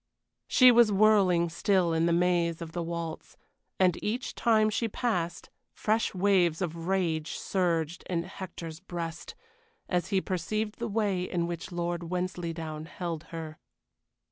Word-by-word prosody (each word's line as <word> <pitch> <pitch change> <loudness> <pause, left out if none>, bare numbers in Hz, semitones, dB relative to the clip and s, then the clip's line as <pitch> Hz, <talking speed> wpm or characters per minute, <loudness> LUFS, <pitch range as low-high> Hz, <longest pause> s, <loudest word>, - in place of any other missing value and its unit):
She 255 -1 +7
was 235 -2 +6
whirling 195 -4 +4
still 175 0 +2
in 165 +1 +2
the - - +2
maze 170 -1 +2
of 165 -2 -7
the 175 - -3
waltz, 170 -1 -5 0.4
and 180 -2 +2
each 240 +5 -2
time 215 -2 +3
she 230 +2 0
passed 185 -7 -2 0.2
fresh 220 -1 0
waves 180 -4 +3
of 170 -1 -4
rage 165 -5 0
surged 170 -3 -1
in 170 -2 0
Hector's 170 -3 -8
breast, 170 -3 -6 0.5
as 180 -1 0
he 195 -3 +2
perceived 210 +5 -3
the 235 - -2
way 205 -4 0
in 180 -1 -1
which 170 +1 -5
Lord 175 0 -2
Wensleydown 170 -4 -3
held 170 -3 -5
her. 160 -2 -7
175 Hz, 145 wpm, -29 LUFS, 170-195 Hz, 0.5 s, She